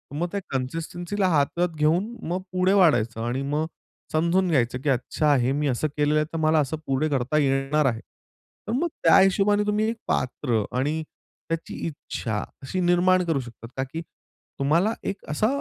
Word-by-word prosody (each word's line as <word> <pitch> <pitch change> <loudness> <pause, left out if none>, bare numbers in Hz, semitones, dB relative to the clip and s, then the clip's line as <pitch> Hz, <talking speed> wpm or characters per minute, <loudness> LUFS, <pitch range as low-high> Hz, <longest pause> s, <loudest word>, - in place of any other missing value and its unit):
मग 170 +4 -1
त्या 200 - -1
कन्सिस्टन्सीला 170 +8 -2
हातात 170 +3 +2
घेऊन 160 +6 +2 0.2
मग 180 +3 -1
पुढे 185 +1 +2
वाढायचं 120 - +3
आणि 120 +3 -1
मग 150 +2 +1 0.5
समजून 170 +4 +2
घ्यायचं 125 -5 +1
की 150 - -1
अच्छा 140 +3 +1
हे 125 +1 +1
मी 145 +2 0
असं 135 +3 0
केलेलं 150 0 +2
आहे, 150 - +1
तर - - -2
मला 155 0 +3
असं 150 +2 -1
पुढे 135 +3 +1
करता 135 +1 0
ये 145 -2 +3
येणार 135 +2 +1
आहे. 115 -4 +1
तर, 215 - -14
मग 300 +8 +1 0.2
त्या 165 - +7
हिशोबाने 200 +2 +3
तुम्ही 210 +1 +1
एक 230 - -2
पात्र 125 -3 0
आणि 150 +5 0 0.5
त्याची 165 0 -3
इच्छा 115 -8 -4 0.2
अशी 160 +8 -3
निर्माण 180 +1 +4
करू 165 -4 +1
शकता 120 -2 -9
का 130 - +1
की 165 - -3 0.6
तुम्हाला 165 +10 +2
एक 195 - -4
असा 155 +8 +1
155 Hz, 175 wpm, -25 LUFS, 135-180 Hz, 0.6 s, त्या